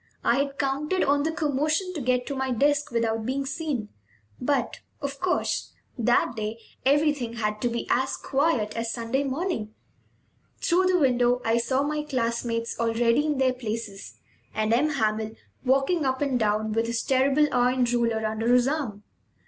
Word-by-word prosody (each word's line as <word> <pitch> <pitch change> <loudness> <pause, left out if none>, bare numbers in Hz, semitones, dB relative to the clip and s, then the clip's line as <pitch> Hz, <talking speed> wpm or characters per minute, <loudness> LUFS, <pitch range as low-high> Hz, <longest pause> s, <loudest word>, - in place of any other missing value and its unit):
I 240 - +3
had 280 0 -1
counted 295 +6 0
on 285 +1 +3
the 320 +2 0
commotion 310 +4 0
to 310 - -4
get 250 0 +1
to 280 - -4
my 265 0 -1
desk 290 +4 +2
without 225 -1 0
being 270 +4 -2
seen; 270 -7 -3 0.5
but, 255 -2 0 0.2
of 280 -1 -5
course, 365 -1 -1 0.2
that 240 0 +2
day 215 0 -3 0.3
everything 285 -3 +2
had 210 -2 -2
to 245 - +1
be 235 0 -3
as 260 +2 +1
quiet 270 -7 0
as 230 0 -2
Sunday 235 +4 -1
morning. 270 - -3 0.8
Through 365 +2 +2
the 370 -1 +3
window 250 -4 +3
I 230 +1 +3
saw 260 +3 +1
my 300 +1 -1
classmates, 235 -5 -2
already 230 +5 +2
in 300 -2 0
their 260 -1 +3
places, 220 -5 -6 0.4
and 215 +1 +1
M. 280 +6 +3
Hamel 220 -5 -1 0.3
walking 275 +6 +2
up 260 -1 0
and 275 -4 0
down 215 0 +1
with 225 +1 0
his 235 -1 -1
terrible 270 +3 +3
iron 250 +1 +2
ruler 235 -2 0
under 220 +2 0
his 250 0 +5
arm. 265 -9 -2
255 Hz, 165 wpm, -26 LUFS, 230-285 Hz, 0.8 s, his